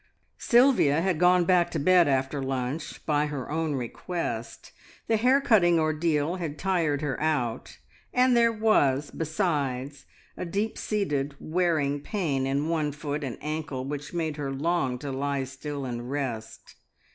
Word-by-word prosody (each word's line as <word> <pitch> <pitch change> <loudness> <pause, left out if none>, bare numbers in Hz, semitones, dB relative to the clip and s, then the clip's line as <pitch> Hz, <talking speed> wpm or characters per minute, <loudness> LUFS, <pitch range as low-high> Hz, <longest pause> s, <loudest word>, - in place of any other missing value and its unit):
Sylvia 240 - +4
had 180 -2 0
gone 180 0 +5
back 175 -1 +3
to - - -3
bed 175 +2 +5
after 135 +1 0
lunch 135 +3 -4
by 150 -1 +1
her 145 -3 -5
own 160 -1 -1
request. 125 -1 -5 0.3
The 225 - +2
hair 250 +5 +4
cutting 195 -11 +4
ordeal 155 +1 0
had 160 -4 -4
tired 165 -7 0
her 145 -3 -2
out, 145 -7 -1 0.3
and 250 0 +4
there 235 -1 +5
was, 150 -11 +2
besides, 145 -5 -2 0.3
a - - -5
deep 200 +5 -2
seated 145 -10 -2
wearing 155 -4 0
pain 145 -9 -1
in 140 +3 0
one 155 -3 0
foot 145 0 -4
and 130 -4 -4
ankle 150 -4 -4
which 145 +1 -5
made 160 -3 -2
her 145 -2 -3
long 135 -2 0
to 140 +2 -5
lie 140 0 -1
still 135 +1 -6
and 120 -1 -5
rest. 125 -6 -5
150 Hz, 150 wpm, -27 LUFS, 140-175 Hz, 0.3 s, gone